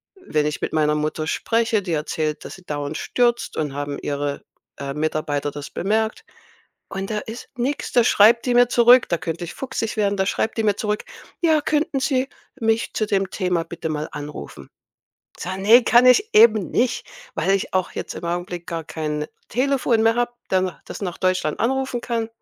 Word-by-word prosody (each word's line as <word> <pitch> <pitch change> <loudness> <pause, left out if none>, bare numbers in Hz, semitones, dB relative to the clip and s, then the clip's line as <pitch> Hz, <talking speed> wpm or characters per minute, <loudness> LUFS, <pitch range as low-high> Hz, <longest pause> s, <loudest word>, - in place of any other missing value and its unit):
wenn 155 - -1
ich 150 - -3
mit - - -3
meiner 150 -1 +2
Mutter 155 +1 -2
spreche, 230 +2 +1
die 175 -3 -3
erzählt, 155 0 -2
dass - - -7
sie 185 - -16
dauernd 145 0 -3
stürzt 240 -1 0
und 150 -3 -2
haben 145 0 -3
Ihre, 145 0 -3 0.4
äh, 140 0 -4
Mitarbeiter 150 -1 -1
das 145 0 -7
bemerkt?“ 220 +3 -1 0.6
Und 195 0 -4
da 210 - -1
ist 225 +3 -9
nix. 265 +4 -2
Da 240 - +5
schreibt 230 +1 +5
die 250 - +1
mir 245 0 +6
zurück 240 +1 +6
da 170 - +1
könnte 165 +1 -4
ich 170 - -8
fuchsig 250 -5 -4
werden 205 -1 +2
da 190 - +1
schreibt 220 - -1
die - - +1
mir 205 -2 +2
zurück: 210 -1 -2 0.4
„Ja, 320 -3 +4
könnten 295 -2 0
Sie 260 0 +1 0.3
mich 225 0 0
zu 215 - -1
dem 195 -2 0
Thema 180 -3 0
bitte 165 -1 -6
mal 155 0 -2
anrufen?“ 145 - -8 0.7
Ich - - -7
sage: 190 +2 -4
„Ne, 230 +5 +7
kann 240 +2 +5
ich 410 - +5
eben 215 -3 +6
nicht, 245 0 0 0.3
weil 195 - +1
ich 195 0 0
auch 185 -1 +1
jetzt - - -5
im - - -8
Augenblick 175 0 -3
gar 165 -1 -4
kein 150 -1 -3 0.2
Telefon 255 -2 +1
mehr 225 0 +4
habe, 240 0 0 0.2
dann 185 -1 +1
das - - -8
nach 180 -3 -4
Deutschland 185 -5 0
anrufen 260 0 0
kann.“ 230 -2 -2
195 Hz, 195 wpm, -22 LUFS, 155-235 Hz, 0.7 s, Ne